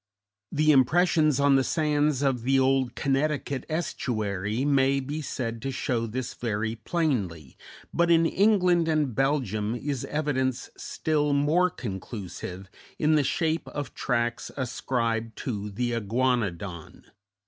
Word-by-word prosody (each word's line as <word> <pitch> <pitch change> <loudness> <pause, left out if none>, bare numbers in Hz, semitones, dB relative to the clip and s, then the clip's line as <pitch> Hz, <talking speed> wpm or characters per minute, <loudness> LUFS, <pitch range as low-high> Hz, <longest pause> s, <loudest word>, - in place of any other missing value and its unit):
The 155 +1 +3
impressions 155 +1 +4
on 140 -1 +5
the 135 - +3
sands 150 -2 +1
of 135 -4 +1
the 135 +3 +2
old 130 -2 +2
Connecticut 140 -1 -1
estuary 110 - -2
may 135 -1 +3
be 145 +4 -4
said 115 -5 -4
to 135 - -3
show 120 -3 -1
this 125 +3 -4
very 110 -1 -2
plainly, 105 - -2 0.4
but 170 0 +2
in 165 -1 +5
England 180 -3 +3
and 155 -5 +1
Belgium 120 -5 0
is 135 +1 -3
evidence 130 -4 -1
still 150 -2 -1
more 155 +6 +3
conclusive, 95 - -7 0.3
in 155 0 +2
the 150 -2 +4
shape 160 +3 0
of 145 -1 -5
tracks 120 -2 -1
ascribed 115 -3 -2
to 105 -6 -3
the 120 +4 -2
Iguanodon. 105 -7 -2
130 Hz, 125 wpm, -27 LUFS, 115-150 Hz, 0.4 s, on